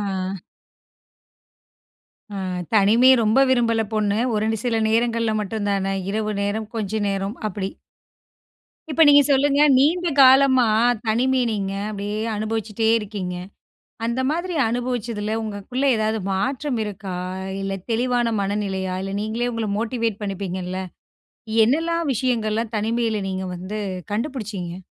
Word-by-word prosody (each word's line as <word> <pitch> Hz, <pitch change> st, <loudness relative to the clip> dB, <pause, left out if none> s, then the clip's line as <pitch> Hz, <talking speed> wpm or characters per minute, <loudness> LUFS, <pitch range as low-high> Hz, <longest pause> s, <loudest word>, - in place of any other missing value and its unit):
ஆ. 190 Hz, -1 st, -3 dB, 2.0 s
ஆ -, -, -5 dB, 0.4 s
தனிமைய 230 Hz, +6 st, +6 dB
ரொம்ப 220 Hz, +4 st, +3 dB
விரும்பல 230 Hz, -3 st, +2 dB
பொண்ணு. 210 Hz, -1 st, +1 dB, 0.2 s
ஒரு 210 Hz, -, 0 dB
நி 220 Hz, -, -2 dB
சில 230 Hz, -2 st, +1 dB
நேரங்கள்ல 230 Hz, 0 st, +1 dB
மட்டும்தானே, 200 Hz, -2 st, -1 dB, 0.2 s
இரவு 215 Hz, 0 st, -1 dB
நேரம், 215 Hz, +2 st, -2 dB
கொஞ்ச 210 Hz, -2 st, -3 dB, 0.2 s
நேரம், 195 Hz, +2 st, -2 dB
அப்படி? 195 Hz, -1 st, -4 dB, 1.2 s
இப்ப 325 Hz, +2 st, +3 dB
நீங்க 285 Hz, 0 st, +8 dB
சொல்லுங்க, 280 Hz, +1 st, +3 dB, 0.2 s
நீண்ட 340 Hz, +6 st, +3 dB
காலமா, 260 Hz, -1 st, +6 dB, 0.4 s
தனிமை 255 Hz, +4 st, +2 dB
நீங்க 200 Hz, -3 st, -2 dB, 0.2 s
அப்டியே 205 Hz, +1 st, -4 dB, 0.2 s
அனுபவிச்சிட்டே 220 Hz, 0 st, -1 dB
இருக்கீங்க, 195 Hz, -4 st, -5 dB, 0.7 s
அந்த 235 Hz, +3 st, -1 dB
மாதிரி 345 Hz, +2 st, -2 dB
அனுபவிச்சதுல 230 Hz, -3 st, -2 dB
உங்களுக்குள்ள 215 Hz, +5 st, -4 dB
ஏதாவது 220 Hz, 0 st, 0 dB
மாற்றம் 260 Hz, +6 st, -1 dB
இருக்கா? 195 Hz, -2 st, -6 dB, 0.3 s
அ 190 Hz, -, -5 dB, 0.2 s
இல்ல 195 Hz, 0 st, -2 dB, 0.2 s
தெளிவான 240 Hz, -1 st, +1 dB
மனநிலையா? 195 Hz, -2 st, -2 dB
இல்ல 195 Hz, 0 st, -4 dB
நீங்களே 230 Hz, +3 st, -2 dB
உங்கள 225 Hz, -2 st, -2 dB
மோட்டிவேட் 230 Hz, -2 st, -2 dB
பண்ணிப்பீங்கல்ல! 185 Hz, -2 st, -4 dB, 0.8 s
என்னெல்லாம் 330 Hz, +6 st, +1 dB
விஷயங்கள்லாம் 225 Hz, -2 st, -1 dB
தனிமையில 225 Hz, 0 st, 0 dB
நீங்க 190 Hz, 0 st, -3 dB
வந்து 185 Hz, +4 st, -5 dB, 0.3 s
கண்டுபிடிச்சீங்க? 210 Hz, -, -4 dB
220 Hz, 115 wpm, -22 LUFS, 200-245 Hz, 2.0 s, நீங்க